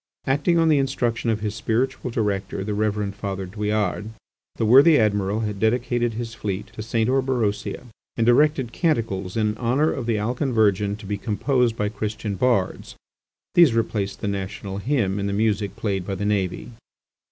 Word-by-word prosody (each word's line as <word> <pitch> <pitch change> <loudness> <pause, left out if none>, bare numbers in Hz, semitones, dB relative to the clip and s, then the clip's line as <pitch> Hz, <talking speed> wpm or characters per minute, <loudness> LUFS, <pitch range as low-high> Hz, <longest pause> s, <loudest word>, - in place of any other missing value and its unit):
Acting 145 +6 +2
on 165 -1 +4
the 150 -3 +4
instruction 120 -4 -1
of 110 -2 0
his 105 -1 -2
spiritual 125 +4 -1
director, 100 -4 -2
the 105 +1 -3
Reverend 105 -1 -1
Father 100 -1 -4
Douillard, 105 +1 -2 0.5
the 115 - 0
worthy 140 +7 +7
Admiral 105 -1 +1
had 105 -2 -3
dedicated 120 +1 +1
his 115 -1 -5
fleet 100 -3 -4
to - - -7
St. 110 0 0
Orberosia 125 -6 0 0.3
and 115 - +2
directed 130 0 +3
canticles 115 - -1
in 105 -1 +1
honour 130 +6 +2
of 125 -4 -4
the 115 -2 +1
Alcan 125 +5 -1
Virgin 105 -2 +2
to 105 0 -12
be 100 0 -3
composed 115 +3 0
by 105 - 0
Christian 105 0 -4
bards. 100 -2 0 0.6
These 165 -9 +6
replaced 105 -3 -1
the 105 - -2
national 100 0 -4
hymn 105 -5 0
in 100 - -1
the 100 - -2
music 105 -1 0
played 100 -4 -2
by 100 - -2
the 100 +2 -3
navy. 100 +2 -1
110 Hz, 170 wpm, -23 LUFS, 100-120 Hz, 0.6 s, worthy